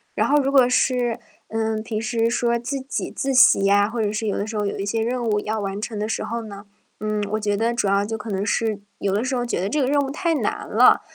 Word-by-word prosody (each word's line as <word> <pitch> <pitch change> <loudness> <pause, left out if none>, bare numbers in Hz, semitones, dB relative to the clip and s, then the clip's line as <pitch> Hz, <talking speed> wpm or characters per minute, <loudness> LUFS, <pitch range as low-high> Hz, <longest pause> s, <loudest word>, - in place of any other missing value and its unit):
然 - - +1
后 295 +1 +4
如 275 0 0
果 265 -3 +6
是， 250 -1 +1 0.3
嗯， 220 -1 -1
平 220 -1 -3
时 230 0 0
说 235 0 +1
自 260 +4 -4
己 265 +1 -4
自 270 -1 -2
习 200 -5 +6
啊， 205 0 +4
或 230 +1 -3
者 210 -1 0
是 215 +1 -3
有 205 - -1
的 205 - -2
时 220 0 -4
候 210 - 0
有 200 - -3
一 - - -2
些 225 +2 -1
任 245 +1 -2
务 210 -3 +1
要 215 +1 -3
完 200 -1 -3
成 215 0 -4
的 210 +1 -2
时 - - -2
候 235 +1 -3
呢， 205 -2 -10 0.3
嗯， 215 0 -2
我 215 - +1
觉 205 -1 0
得 230 +3 0
主 235 -4 0
要 200 +1 +2
就 220 +2 -3
可 220 +1 -8
能 195 0 -1
是， 220 -1 0 0.2
有 195 -1 -1
的 210 - +1
时 260 0 -1
候 245 - -1
觉 235 - -2
得 195 - -1
这 300 - 0
个 265 - +2
任 285 +1 +2
务 275 - -3
太 330 +4 -1
难 - - -2
了， - - +5
225 Hz, 300 characters per minute, -22 LUFS, 210-245 Hz, 0.3 s, 果